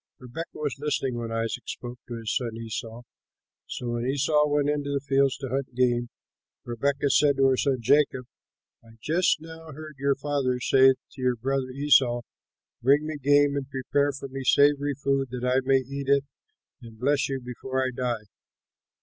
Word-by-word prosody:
Rebekah 125 +7 -7
was 145 -4 -3
listening 140 -3 -1
when 115 -1 -5
Isaac 115 +1 -3
spoke 120 0 -7
to 120 - -6
his 115 -2 -3
son 115 -3 -2
Esau. 115 +1 -6 0.6
So 120 - -5
when 120 +1 -2
Esau 150 +2 +2
went 145 -1 +1
into 145 -1 -1
the 140 0 0
fields 135 -1 +1
to 135 -2 -6
hunt 130 -1 -3
game, 120 -1 +1 0.6
Rebekah 140 +4 0
said 140 0 +4
to 135 - +4
her 130 - +3
son 135 0 +1
Jacob, 130 0 +2 0.6
"I 115 0 -18
just 165 +6 +1
now 160 0 -11
heard 155 0 -10
your 140 0 +2
father 135 -4 -1
say 130 +1 +5
to 130 - -15
your 125 -1 +2
brother 130 +2 -2
Esau, 130 -3 +3 0.6
'Bring 140 +5 +4
me 155 -1 -4
game 145 +1 +4
and 140 -1 -4
prepare 140 +2 0
for 140 0 -7
me 135 0 -6
savory 145 +1 +3
food 135 0 0
that 125 0 -4
I 125 +1 +3
may 135 +1 +4
eat 140 +1 -6
it 140 0 +4 0.6
and 115 -2 -12
bless 140 +4 +1
you 135 -1 -2
before 130 +1 -3
I 130 - -1
die.' 120 -4 -2
135 Hz, 180 wpm, -26 LUFS, 125-145 Hz, 0.6 s, say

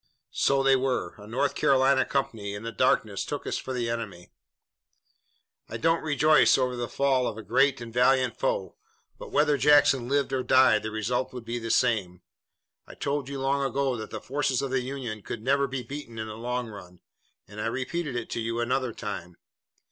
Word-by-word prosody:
"So 135 0 +2
they 135 0 +5
were. 130 -1 -1
A 105 - -11
North 130 +5 0
Carolina 135 -2 +3
company 110 -7 -2
in 100 - -7
the 115 - -4
darkness - - +1
took - - -5
us - - -2
for - - -6
the 125 -2 -2
enemy." 110 -7 -5 1.4
"I 115 - -4
don't 165 +8 +2
rejoice 155 -1 +4
over 125 -1 0
the 120 -1 -3
fall 130 +1 +1
of 110 - -4
a 110 - -7
great 135 +2 +2
and 115 -1 -8
valiant 130 +1 +3
foe, - - -1 0.4
but - - -9
whether 150 - +3
Jackson 140 -3 +4
lived 140 -1 +1
or 130 - +1
died 130 -4 +5
the 110 - -4
result 110 +4 -2
would 125 -2 -8
be 120 +1 -3
the 115 0 -5
same. 105 -8 +1 0.6
I - - -12
told 140 -1 -2
you 140 -1 -5
long 140 +1 0
ago 135 -1 0
that 110 -2 -6
the - - -6
forces 135 -2 -1
of 135 - -3
the 130 -1 +1
Union 125 -5 -5
could 110 +2 -7
never 140 +2 +2
be 130 -1 -4
beaten 120 -2 -8
in 110 0 -4
the 110 - -7
long 125 +2 -3
run, 90 -4 -12 0.5
and 105 +2 -8
I - - -1
repeated 130 +4 -3
it 120 -1 -4
to - - -2
you 115 +1 -2
another 125 0 -1
time. 100 -6 -6
125 Hz, 200 wpm, -27 LUFS, 115-135 Hz, 1.4 s, they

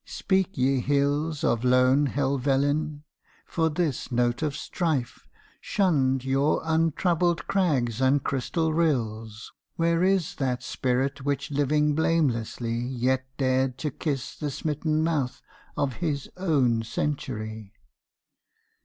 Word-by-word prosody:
speak 190 0 -1
ye 130 +1 +2
hills 145 +3 0
Of 115 0 +1
lone 130 +3 +4
Helvellyn, 140 +2 0 0.4
for 160 -1 0
this 155 -6 -2
note 120 +1 +1
of 150 -3 -1
strife 155 -7 -2 0.3
Shunned 135 -9 +1
your 135 +3 +2
untroubled 165 +2 +1
crags 135 - +1
and 135 +2 +3
crystal 160 +4 -1
rills, 115 -9 -1 0.2
Where 170 +1 +2
is 190 -3 +1
that 130 -3 -1
Spirit 130 +1 -1
which 140 0 -2
living 150 +1 +2
blamelessly 125 -7 0
Yet 130 +1 -1
dared 130 -1 +1
to 150 +2 -3
kiss 140 -1 -3
the 150 - -3
smitten 155 +2 -1
mouth 150 -6 -1 0.4
of 135 -4 -1
his 150 -5 -2
own 140 -11 +2
century! 110 -5 -4
140 Hz, 115 wpm, -26 LUFS, 125-155 Hz, 0.4 s, lone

